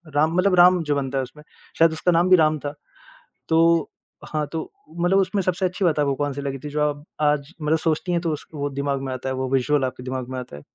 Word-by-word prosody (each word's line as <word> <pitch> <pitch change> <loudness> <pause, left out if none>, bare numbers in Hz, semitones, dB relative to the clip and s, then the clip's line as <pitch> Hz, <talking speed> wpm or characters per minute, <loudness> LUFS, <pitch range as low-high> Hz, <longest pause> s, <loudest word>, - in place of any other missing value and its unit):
राम 155 +3 +2
मतलब 185 0 +3
राम 180 0 +6
जो 150 -2 0
बनता 135 -1 -2
है 135 - +1
उसमें, 135 +4 -12 0.4
शायद 165 0 +6
उसका 170 +3 +1
नाम 175 +2 +3
भी 185 - +8
राम 155 -1 +3
था। 145 0 -5 0.8
तो 165 0 +3 0.4
हाँ 155 -1 -1
तो, 160 -1 -5 0.3
मतलब 175 +3 +3
उसमें 195 +1 +1
सबसे 185 +1 0
अच्छी 185 +2 -1
बात 155 -3 +2
आपको 140 -2 +2
कौन-सी 145 0 -3
लगी 140 -1 -3
थी - - -4
जो 150 +1 -2
आप 145 -1 -1 0.2
आज 150 +1 +1
मतलब 155 +1 +2
सोचती 160 +3 -1
हैं 170 - +1
तो 165 -2 -1
उस 150 - -7
वो 145 -1 -2
दिमाग 140 0 -2
में 135 -1 -3
आता 130 +1 -4
है 130 - -2
वो 130 0 -2
विज़ुअल 135 +2 +1
आपके 125 -1 -6
दिमाग 130 -1 -4
में 130 0 -4
आता 125 -13 -9
है। - - -11
150 Hz, 250 wpm, -23 LUFS, 140-170 Hz, 0.8 s, भी